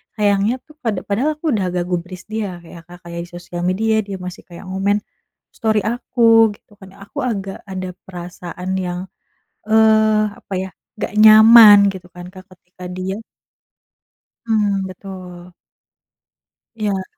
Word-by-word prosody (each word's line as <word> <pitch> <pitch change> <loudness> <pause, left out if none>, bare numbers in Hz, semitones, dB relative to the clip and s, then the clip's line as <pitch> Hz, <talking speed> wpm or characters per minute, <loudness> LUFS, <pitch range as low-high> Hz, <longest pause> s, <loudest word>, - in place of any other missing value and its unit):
sayangnya 205 +1 +2
tuh 305 - -20
pada 220 -8 -2
padahal 255 +10 0
aku 310 +1 -3
udah 205 -6 0
nggak 180 0 -2
gubris 180 +1 -4
dia 195 -6 -4
Kak 165 - -15
ya 170 - -10
Kak, 175 - -12
kayak 170 0 -7
di - - -21
sosial 175 0 -8
media 220 +4 +1
dia 195 - -5
masih 180 -1 -9
kayak 185 +2 -11
ngomen 200 +2 0 0.5
story 220 -1 +1
aku 230 -1 +3
gitu 210 - -25
kan 190 - -12
aku 200 +9 -9
agak 200 -6 -3
ada 185 -1 -5
perasaan 180 0 -8 0.2
yang, 180 0 -4 0.7
eee, 220 -1 +4
apa 200 - -10
ya 190 - -5 0.3
nggak - - -4
nyaman 220 -1 +9 0.2
gitu 180 -1 -11
kan, 175 0 -9
Kak 185 0 -12
ketika 180 +1 -14
dia 185 +1 -4 1.3
Mmm, 205 -4 0
betul. 180 -2 -11 1.2
Iya. 205 -4 -2
195 Hz, 145 wpm, -19 LUFS, 180-220 Hz, 1.3 s, nyaman